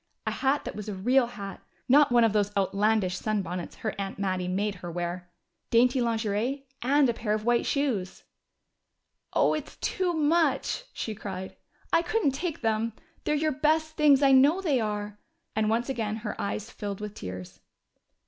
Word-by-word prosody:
A -, -, 0 dB
hat 275 Hz, +2 st, 0 dB
that -, -, -5 dB
was 210 Hz, 0 st, -6 dB
a 205 Hz, -, -4 dB
real 245 Hz, +6 st, +3 dB
hat 200 Hz, -4 st, -8 dB, 0.3 s
not 285 Hz, +1 st, +6 dB
one 240 Hz, -1 st, +5 dB
of 225 Hz, -2 st, +3 dB
those 205 Hz, -1 st, +1 dB
outlandish 200 Hz, -1 st, +1 dB
sunbonnets 185 Hz, -5 st, -3 dB
her 215 Hz, -, 0 dB
aunt 195 Hz, -1 st, -4 dB
Mattie 185 Hz, -2 st, -1 dB
made 200 Hz, +3 st, 0 dB
her 175 Hz, -, -5 dB
wear! 175 Hz, +1 st, -4 dB, 0.4 s
Dainty 245 Hz, +2 st, +4 dB
lingerie 230 Hz, +4 st, -1 dB, 0.2 s
and 275 Hz, +3 st, +4 dB
a 235 Hz, -, +1 dB
pair 220 Hz, -2 st, -2 dB
of 215 Hz, 0 st, -4 dB
white 240 Hz, 0 st, +2 dB
shoes! 245 Hz, -10 st, -1 dB, 1.1 s
"Oh, -, -, +3 dB
it's 305 Hz, -1 st, -5 dB
too 365 Hz, -2 st, -1 dB
much!" 330 Hz, +9 st, +1 dB
she 220 Hz, -, -4 dB
cried. 190 Hz, -3 st, -6 dB, 0.4 s
"I 330 Hz, -, +5 dB
couldn't 350 Hz, -3 st, +1 dB
take 315 Hz, +4 st, -4 dB
them! 225 Hz, 0 st, 0 dB, 0.3 s
They're 300 Hz, -, +2 dB
your 310 Hz, +1 st, +1 dB
best 310 Hz, +2 st, +1 dB
things 290 Hz, -2 st, +5 dB
I 275 Hz, -, +6 dB
know 280 Hz, +7 st, +6 dB
they 305 Hz, -9 st, +1 dB
are." 210 Hz, -1 st, -3 dB, 0.4 s
And 215 Hz, 0 st, +1 dB
once 230 Hz, +2 st, +1 dB
again 225 Hz, -6 st, -2 dB
her 210 Hz, -, -3 dB
eyes 210 Hz, +3 st, -3 dB
filled 200 Hz, -2 st, -5 dB
with 210 Hz, -1 st, -6 dB
tears. 95 Hz, -, -8 dB
225 Hz, 175 wpm, -28 LUFS, 200-275 Hz, 1.1 s, not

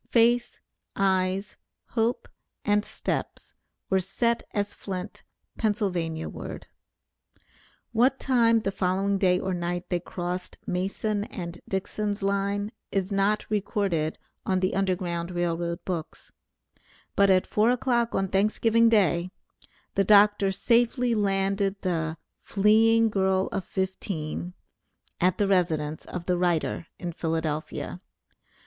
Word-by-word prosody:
Face, 240 Hz, +1 st, +3 dB, 0.4 s
eyes, 190 Hz, +1 st, 0 dB, 0.3 s
hope, 230 Hz, +1 st, 0 dB, 0.4 s
and 205 Hz, 0 st, +3 dB
steps, -, -, -4 dB, 0.4 s
were 190 Hz, -, +4 dB
set 235 Hz, +5 st, 0 dB
as 205 Hz, 0 st, -2 dB
flint, 190 Hz, +1 st, -6 dB, 0.4 s
Pennsylvania 180 Hz, -7 st, -1 dB
ward. -, -, -7 dB, 1.3 s
What 250 Hz, +4 st, +3 dB
time 230 Hz, -4 st, +3 dB
the 195 Hz, -, -1 dB
following 195 Hz, +1 st, 0 dB
day 180 Hz, -2 st, +3 dB
or 190 Hz, -1 st, -2 dB
night 175 Hz, 0 st, -3 dB
they 175 Hz, -, +2 dB
crossed 180 Hz, +1 st, -5 dB
Mason 200 Hz, +3 st, -1 dB
and 175 Hz, -4 st, -7 dB
Dixon's 205 Hz, +1 st, -2 dB
line 200 Hz, +1 st, 0 dB, 0.2 s
is 195 Hz, 0 st, -1 dB
not 200 Hz, +2 st, +1 dB
recorded 200 Hz, -6 st, -1 dB, 0.3 s
on 185 Hz, -1 st, +1 dB
the 185 Hz, 0 st, 0 dB
Underground 180 Hz, -3 st, -1 dB
Rail 175 Hz, -2 st, 0 dB
Road 170 Hz, 0 st, -4 dB
books, 170 Hz, -4 st, -5 dB, 0.8 s
but 200 Hz, 0 st, +5 dB
at 185 Hz, -1 st, +4 dB
four 215 Hz, +2 st, +2 dB
o'clock 245 Hz, -2 st, +1 dB
on 195 Hz, 0 st, +1 dB
Thanksgiving 220 Hz, +4 st, +3 dB
Day, 180 Hz, -5 st, +3 dB, 0.6 s
the 195 Hz, -, +3 dB
Dr. 205 Hz, 0 st, +5 dB
safely 240 Hz, +4 st, +2 dB
landed 195 Hz, -1 st, +1 dB
the 165 Hz, -3 st, -1 dB, 0.2 s
"fleeing 225 Hz, +2 st, +4 dB
girl 190 Hz, -1 st, +1 dB
of 195 Hz, -3 st, -3 dB
fifteen" 180 Hz, -2 st, -3 dB, 0.6 s
at 180 Hz, 0 st, +2 dB
the 205 Hz, -, +2 dB
residence 160 Hz, -5 st, 0 dB
of 180 Hz, -1 st, -6 dB
the 180 Hz, -1 st, +1 dB
writer 175 Hz, -1 st, 0 dB
in 175 Hz, -2 st, -4 dB
Philadelphia. 160 Hz, +1 st, -3 dB
195 Hz, 120 wpm, -27 LUFS, 180-210 Hz, 1.3 s, but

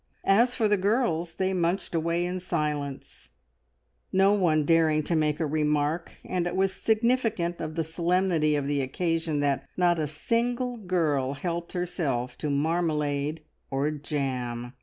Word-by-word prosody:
As 235 Hz, +6 st, +4 dB
for 225 Hz, -3 st, +2 dB
the 205 Hz, 0 st, +3 dB
girls, 185 Hz, -5 st, 0 dB
they 190 Hz, 0 st, 0 dB
munched 180 Hz, +1 st, -1 dB
away 170 Hz, +1 st, 0 dB
in 180 Hz, +1 st, -3 dB
silence, 145 Hz, -, -3 dB, 0.8 s
no 195 Hz, +2 st, +4 dB
one 160 Hz, -7 st, +2 dB
daring 160 Hz, -1 st, +3 dB
to 170 Hz, -, -1 dB
make 150 Hz, -1 st, +1 dB
a 160 Hz, -, +1 dB
remark, 150 Hz, +2 st, 0 dB
and 180 Hz, -1 st, -1 dB
it 175 Hz, -, -3 dB
was 190 Hz, 0 st, +2 dB
significant 220 Hz, -6 st, +1 dB
of 155 Hz, -1 st, -4 dB
the 165 Hz, -, 0 dB
solemnity 170 Hz, -1 st, +1 dB
of 145 Hz, -1 st, -1 dB
the 140 Hz, 0 st, 0 dB
occasion 160 Hz, +2 st, -1 dB
that 140 Hz, -2 st, 0 dB
not 175 Hz, -2 st, +3 dB
a 155 Hz, -, 0 dB
single 240 Hz, -, -1 dB
girl 160 Hz, -, 0 dB
helped 170 Hz, +3 st, -4 dB
herself 150 Hz, -9 st, -2 dB
to 150 Hz, -, -2 dB
marmalade 150 Hz, -1 st, 0 dB, 0.3 s
or 140 Hz, +3 st, 0 dB
jam. 130 Hz, -5 st, -3 dB
165 Hz, 150 wpm, -27 LUFS, 150-185 Hz, 0.8 s, As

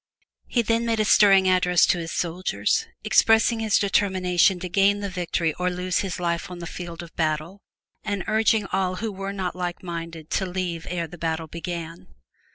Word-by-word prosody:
He 235 Hz, -, +1 dB
then 230 Hz, +1 st, +1 dB
made 225 Hz, -1 st, 0 dB
a 215 Hz, -, +2 dB
stirring 195 Hz, -3 st, +6 dB
address 180 Hz, -1 st, +4 dB
to 175 Hz, -, +1 dB
his 165 Hz, 0 st, -5 dB
soldiers, 175 Hz, +2 st, -1 dB, 0.2 s
expressing 225 Hz, +1 st, +4 dB
his 220 Hz, -2 st, +2 dB
determination 190 Hz, -2 st, +2 dB
to 180 Hz, -, -4 dB
gain 200 Hz, +3 st, +3 dB
the 200 Hz, -1 st, -4 dB
victory 175 Hz, -2 st, -1 dB
or 180 Hz, 0 st, +1 dB
lose 180 Hz, 0 st, -1 dB
his 190 Hz, -2 st, -3 dB
life 170 Hz, +2 st, -2 dB
on 180 Hz, -, -7 dB
the 175 Hz, -, -7 dB
field 170 Hz, 0 st, -7 dB
of 170 Hz, -, -14 dB
battle 160 Hz, +4 st, -2 dB, 0.4 s
and 205 Hz, -3 st, -2 dB
urging 220 Hz, -1 st, +2 dB
all 185 Hz, -1 st, 0 dB
who 220 Hz, +3 st, -3 dB
were 195 Hz, 0 st, -5 dB
not 190 Hz, -3 st, -3 dB
like 180 Hz, 0 st, -4 dB
minded 165 Hz, -2 st, -7 dB
to 190 Hz, -, 0 dB
leave 175 Hz, -2 st, -4 dB
ere 175 Hz, -2 st, -2 dB
the 170 Hz, +1 st, -12 dB
battle 160 Hz, 0 st, -2 dB
began. 170 Hz, 0 st, -7 dB
180 Hz, 185 wpm, -24 LUFS, 170-200 Hz, 0.4 s, stirring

